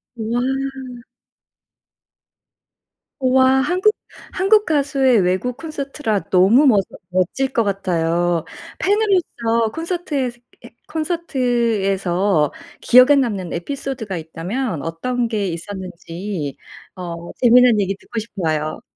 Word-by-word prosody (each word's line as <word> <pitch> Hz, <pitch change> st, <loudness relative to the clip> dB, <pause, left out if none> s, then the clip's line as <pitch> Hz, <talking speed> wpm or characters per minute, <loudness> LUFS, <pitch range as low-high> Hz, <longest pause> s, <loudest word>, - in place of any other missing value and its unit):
와. 255 Hz, +4 st, -2 dB, 2.5 s
우와. 260 Hz, 0 st, +4 dB
한국, 365 Hz, +8 st, +2 dB, 0.4 s
한국 415 Hz, +3 st, +3 dB
가수의 275 Hz, -5 st, +2 dB
외국 185 Hz, +7 st, 0 dB
콘서트라 280 Hz, -8 st, -3 dB
너무 195 Hz, +10 st, +5 dB
멋 210 Hz, -6 st, +5 dB, 0.3 s
멋질 185 Hz, +9 st, 0 dB
것 230 Hz, -, +2 dB
같아요. 175 Hz, -4 st, 0 dB, 0.4 s
팬으로서 350 Hz, -, +1 dB
콘서트에서 325 Hz, -8 st, -3 dB, 0.3 s
해 -, -, -11 dB, 0.2 s
콘서트에서 225 Hz, -, 0 dB, 0.3 s
기억에 255 Hz, +4 st, +6 dB
남는 210 Hz, -10 st, -1 dB
에피소드가 245 Hz, +1 st, -4 dB
있다면 170 Hz, -, -4 dB
어떤 235 Hz, -, -2 dB
게 210 Hz, -3 st, -1 dB
있었는지 175 Hz, -2 st, -6 dB, 0.4 s
어 170 Hz, -2 st, -7 dB
재밌는 245 Hz, -2 st, +6 dB
얘기 195 Hz, 0 st, -1 dB
듣고 230 Hz, -, -10 dB
싶어요. 160 Hz, -8 st, -3 dB
230 Hz, 225 characters per minute, -20 LUFS, 185-270 Hz, 2.5 s, 기억에